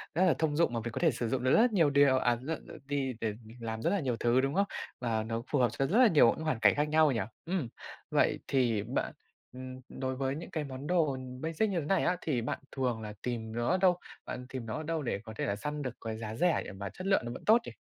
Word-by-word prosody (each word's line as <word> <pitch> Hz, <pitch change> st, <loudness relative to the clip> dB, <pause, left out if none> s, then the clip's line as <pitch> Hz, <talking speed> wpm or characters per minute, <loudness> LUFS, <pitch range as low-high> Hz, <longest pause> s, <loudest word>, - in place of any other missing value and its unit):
rất 185 Hz, -, +4 dB
là 180 Hz, -, +5 dB
thông 155 Hz, -2 st, +1 dB
dụng 165 Hz, -6 st, +2 dB
mà 115 Hz, -, 0 dB
mình 120 Hz, -, -3 dB
có -, -, -4 dB
thể 165 Hz, -4 st, +4 dB
sử 120 Hz, -1 st, -3 dB
dụng 130 Hz, 0 st, -1 dB
được 130 Hz, -, +3 dB
rất 235 Hz, +1 st, +5 dB
nhiều 165 Hz, -7 st, +4 dB
điều 140 Hz, -2 st, +5 dB
à, 120 Hz, -2 st, +2 dB
nó 155 Hz, +5 st, -2 dB
nó -, -, -12 dB
đi 135 Hz, -2 st, -1 dB
để 110 Hz, -2 st, 0 dB
mình 110 Hz, +3 st, -13 dB
làm 110 Hz, -1 st, -4 dB
rất 170 Hz, -, +1 dB
là 200 Hz, 0 st, +1 dB
nhiều 125 Hz, -6 st, -1 dB
thứ, 120 Hz, +2 st, +3 dB
đúng 135 Hz, +1 st, 0 dB
không? 200 Hz, +1 st, +3 dB, 0.3 s
Và 115 Hz, -3 st, 0 dB
nó 115 Hz, +1 st, -3 dB
phù 145 Hz, -, +2 dB
hợp 120 Hz, -, +4 dB
cho 135 Hz, -, 0 dB
rất 200 Hz, -, +2 dB
là 255 Hz, -, +8 dB
nhiều 150 Hz, -, +6 dB
những 160 Hz, -, -6 dB
hoàn 145 Hz, -8 st, 0 dB
cảnh -, -, +5 dB
khác 150 Hz, +1 st, +1 dB
nhau 155 Hz, -2 st, +5 dB
nhỉ? 115 Hz, -, 0 dB, 0.2 s
Ừm. 170 Hz, -7 st, -1 dB, 0.4 s
Vậy -, -, +3 dB
thì 120 Hz, -6 st, +2 dB
bạn, 120 Hz, +4 st, -2 dB, 0.4 s
ừm, 130 Hz, 0 st, -8 dB
đối 130 Hz, 0 st, -3 dB
với 135 Hz, +1 st, -1 dB
những 160 Hz, -, -8 dB
cái 155 Hz, -, -2 dB
món 135 Hz, +1 st, -7 dB
đồ, 165 Hz, -5 st, +3 dB
ừm, 130 Hz, -1 st, -7 dB
basic 165 Hz, +7 st, 0 dB
như 185 Hz, -3 st, 0 dB
thế 150 Hz, -, -4 dB
này 195 Hz, +5 st, +2 dB
á, 180 Hz, 0 st, +2 dB
thì 135 Hz, -7 st, 0 dB
bạn 115 Hz, -, -3 dB
thường 125 Hz, -4 st, -1 dB
là 105 Hz, -1 st, -6 dB
tìm 115 Hz, -3 st, -3 dB
nó 120 Hz, 0 st, -1 dB
ở 185 Hz, -, +3 dB
đâu? 180 Hz, -1 st, +4 dB, 0.3 s
Bạn 125 Hz, -, -6 dB
tìm 130 Hz, -3 st, -5 dB
nó 110 Hz, -, -4 dB
ở 155 Hz, -, -4 dB
đâu 165 Hz, 0 st, -2 dB
để 120 Hz, -, -1 dB
có 110 Hz, -1 st, -9 dB
thể -, -, -1 dB
là 100 Hz, -, 0 dB
săn 150 Hz, +7 st, -4 dB
được 130 Hz, -3 st, -4 dB
cái 110 Hz, -1 st, -3 dB
giá 110 Hz, -1 st, -5 dB
rẻ 175 Hz, +4 st, +2 dB
để -, -, -7 dB
mà 100 Hz, 0 st, -6 dB
chất 185 Hz, -, -7 dB
lượng 195 Hz, -, +4 dB
nó 120 Hz, -, -4 dB
vẫn -, -, -8 dB
tốt 230 Hz, +2 st, +6 dB
nhỉ? -, -, -6 dB
130 Hz, 295 wpm, -31 LUFS, 120-160 Hz, 0.4 s, là